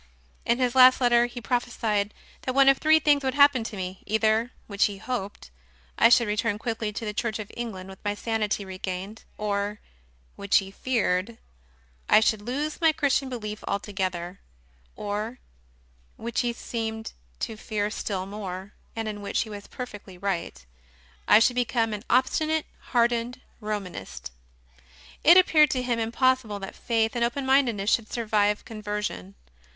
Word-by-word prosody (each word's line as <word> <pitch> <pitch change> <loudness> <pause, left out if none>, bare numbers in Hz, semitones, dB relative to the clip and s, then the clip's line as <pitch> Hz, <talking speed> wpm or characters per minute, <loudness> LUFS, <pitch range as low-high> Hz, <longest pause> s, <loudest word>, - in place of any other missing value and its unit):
In 235 - +3
his 250 -2 +1
last 255 0 +7
letter 240 -1 +4
he 245 0 -8
prophe 245 +1 -1
sied 210 -3 0 0.3
that 255 - -3
one 275 0 +6
of 275 - +4
three 310 +1 +5
things 295 -2 +3
would 265 0 -1
happen 285 -4 +5
to 220 - -6
me: 185 0 -5
either 220 +2 +2 0.2
(which 200 -1 +2
he 205 -2 -3
hoped) 205 - -5 0.4
I - - +6
should 235 -1 +5
return 210 0 0
quickly 220 -1 -3
to 220 +2 -5
the 210 - -3
Church 215 0 -2
of 215 -2 -7
England 210 -6 -5
with 190 -1 -12
my 205 0 -1
sanity 210 -2 -1
regained, 190 +2 -6
or 205 0 -2 0.6
(which 200 0 +3
he 195 -1 -1
feared) 225 -2 -1 0.7
I - - +7
should 220 -1 +1
lose 285 +9 -3
my 325 -1 +6
Chris 290 -4 +2
tian 270 -1 -7
belief 215 -4 -6
altogether, 190 -3 -3 0.6
or 210 +4 -4 0.8
(which 230 0 -3
he 240 - 0
seemed 225 -2 -5 0.3
to 225 - -3
fear 210 -1 -2
still 195 -4 -3
more, 195 -1 -7 0.2
and 225 -1 -3
in 210 -1 -5
which 200 - -1
he 220 - -5
was 205 -1 -8
perfectly 205 -7 -8
right) 175 - -3 0.6
I - - +8
should 230 +2 +4
become 235 -2 0
an 210 - -4
obstinate, 310 +5 +2 0.2
hardened 240 0 +1 0.2
Romanist. 205 - -5 0.9
It 340 +3 +8
appeared 310 -5 +6
to 255 -2 -1
him 240 -2 0
impossible 235 -1 +1
that 195 -1 -7
faith 225 0 0
and 240 - +1
open 245 +3 -1
mindedness 240 -7 +2
should 225 -2 +1
survive 210 -3 +1
conversion. 210 - -5
220 Hz, 160 wpm, -26 LUFS, 205-245 Hz, 0.9 s, I